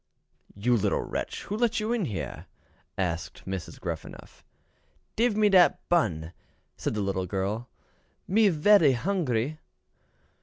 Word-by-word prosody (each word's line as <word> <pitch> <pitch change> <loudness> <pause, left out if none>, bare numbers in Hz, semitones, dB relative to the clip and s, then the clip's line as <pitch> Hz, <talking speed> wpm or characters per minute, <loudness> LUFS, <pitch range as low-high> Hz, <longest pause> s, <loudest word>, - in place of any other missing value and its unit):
"You 120 +5 +2
little 110 - +1
wretch, - - -4
who 205 - -4
let 230 0 +1
you 215 +2 -1
in 225 -6 0
here?" 105 -9 -5 0.5
asked 85 -3 -3
Gruffanuff. 95 -2 -7 0.7
"Dive 230 -2 +2
me 215 -1 +5
dat 185 -3 +5
bun," 90 - +1 0.4
said - - -3
the 105 - -1
little 95 -2 -1
girl, 100 +6 -3 0.6
"me 210 +2 +4
vely 160 -3 +5
hungry." 155 - -1
140 Hz, 120 wpm, -27 LUFS, -, 0.7 s, me